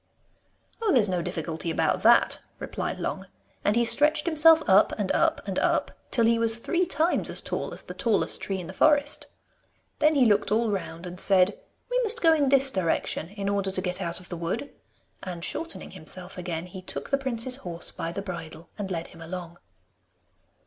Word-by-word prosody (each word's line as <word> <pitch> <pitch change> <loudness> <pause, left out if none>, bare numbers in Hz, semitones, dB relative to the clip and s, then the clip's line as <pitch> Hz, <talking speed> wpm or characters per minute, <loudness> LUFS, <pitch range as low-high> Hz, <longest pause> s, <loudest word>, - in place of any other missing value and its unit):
'Oh, 440 -3 +2
there's 240 -7 +4
no 180 -2 -1
difficulty 165 -1 -4
about 165 - 0
that,' - - +5 0.2
replied - - -4
Long, - - -4 0.4
and 205 - +2
he 235 0 +3
stretched 300 +5 +4
himself 320 -1 +5
up - - +5
and - - 0
up - - +1
and - - -1
up - - +1 0.2
till 230 -3 +2
he 230 0 +3
was 230 0 +4
three 350 +9 0
times 330 +1 +1
as - - 0
tall - - -3
as - - -3
the - - -8
tallest 225 -4 0
tree 195 -1 -3
in 180 - -6
the 185 - -8
forest. 290 +5 +2 0.7
Then 305 +1 +4
he 265 -3 +5
looked 205 -2 +2
all 225 0 +2
round 180 -3 -5
and 180 0 -8
said, 190 0 +5 0.4
'We - - +2
must 465 0 +1
go 325 -5 +5
in 290 -4 +2
this 270 0 +4
direction 170 -3 -1
in 200 0 -5
order 200 -1 0
to 190 - 0
get 180 0 -2
out 170 +1 -2
of 180 - -13
the 175 - -5
wood,' 170 +12 -4 0.5
and 175 -2 -5
shortening 330 +1 -4
himself 180 +4 -6
again, 175 -2 -4
he 185 +1 -9
took 185 - -5
the 275 - +3
prince's 255 -1 0
horse 175 -8 -4
by 165 - -5
the 195 +3 -5
bridle, 165 -3 -8
and 200 -2 -3
led 170 -2 -4
him 165 - -15
along. 170 0 -7
200 Hz, 195 wpm, -26 LUFS, 175-275 Hz, 0.7 s, that